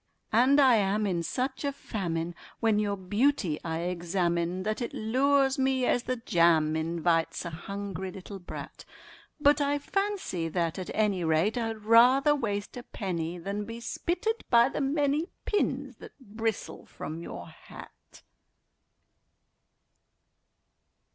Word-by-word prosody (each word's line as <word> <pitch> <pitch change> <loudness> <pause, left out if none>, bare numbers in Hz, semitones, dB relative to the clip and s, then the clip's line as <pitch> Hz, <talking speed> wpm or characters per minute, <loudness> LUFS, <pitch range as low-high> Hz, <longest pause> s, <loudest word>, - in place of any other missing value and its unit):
And 260 +5 +5
I 260 -4 +6
am 205 +1 +1
in 180 -4 0
such 260 - -3
a 285 - 0
famine 175 -10 -3 0.3
when 220 -2 +2
your 205 -1 0
beauty 205 - +1
I 165 0 -2
examine 175 0 -1
That 215 +4 -2
it 240 - -4
lures 270 +4 +2
me 265 -1 +2
as 245 - +2
the 255 +1 -2
jam 165 -8 +3
invites 165 +1 0
a 170 - -4
hungry 190 +2 -5
little 195 +1 -9
brat; 175 - -9 0.6
But 290 0 +4
I 285 0 +1
fancy 385 - -2
that, 170 0 -1
at 185 - -6
any 205 -4 +1
rate, 160 +6 +2
I'd 225 -3 -3
rather 250 +6 +6
waste 205 -7 -3
a - - -5
penny 180 -7 -4
Than 200 +4 -4
be 230 +1 -7
spitted 360 - -2
by 235 +1 +6
the - - -3
many 290 +3 +1 0.2
pins 275 - -1
that - - -13
bristle 225 -2 -4
from 160 +2 -7
your 85 - -7
hat. - - -14
210 Hz, 135 wpm, -28 LUFS, 175-265 Hz, 0.6 s, I